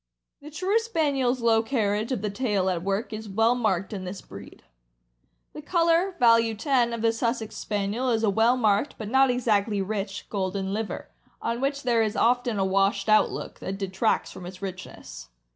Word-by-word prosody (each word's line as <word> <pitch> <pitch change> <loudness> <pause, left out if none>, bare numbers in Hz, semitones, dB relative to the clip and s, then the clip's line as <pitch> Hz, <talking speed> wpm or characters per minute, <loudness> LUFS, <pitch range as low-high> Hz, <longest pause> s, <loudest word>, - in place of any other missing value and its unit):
The 295 - -10
true 375 +8 +1
Spaniel's 285 - 0
low 225 -1 +4
carriage 220 -2 -1
of 230 -6 -2
the 210 - -1
tail 200 -5 0
at 175 -2 -2
work 200 +4 -2
is 215 0 -6
well 225 +4 +3
marked 215 -6 -1
in 195 -2 -5
this 185 +1 -6
breed. 100 +1 -12 0.9
The 300 - -8
color 340 +3 +2
(value 230 -1 +4
10) 245 0 +1
of 230 -1 -4
the 225 0 +3
Sussex 230 -1 -2
Spaniel 210 +5 -2
is 225 -2 +1
a 215 - +3
well 230 +5 +3
marked, 215 +3 +1
but 215 -2 -6
not 265 +2 +4
exactly 215 -4 +1
rich, 195 0 -3
golden 195 -1 -2
liver, 220 0 -4 0.3
on 235 +1 -3
which 280 +1 -1
there 240 -2 +2
is 215 -1 0
often 245 -1 +2
a 195 - +1
washed 195 +1 +1
out 215 - +5
look - - -7
that 195 +1 -5
detracts 195 +3 -1
from 175 - -9
its 185 0 -10
richness. 185 - -8
220 Hz, 185 wpm, -26 LUFS, 195-245 Hz, 0.9 s, out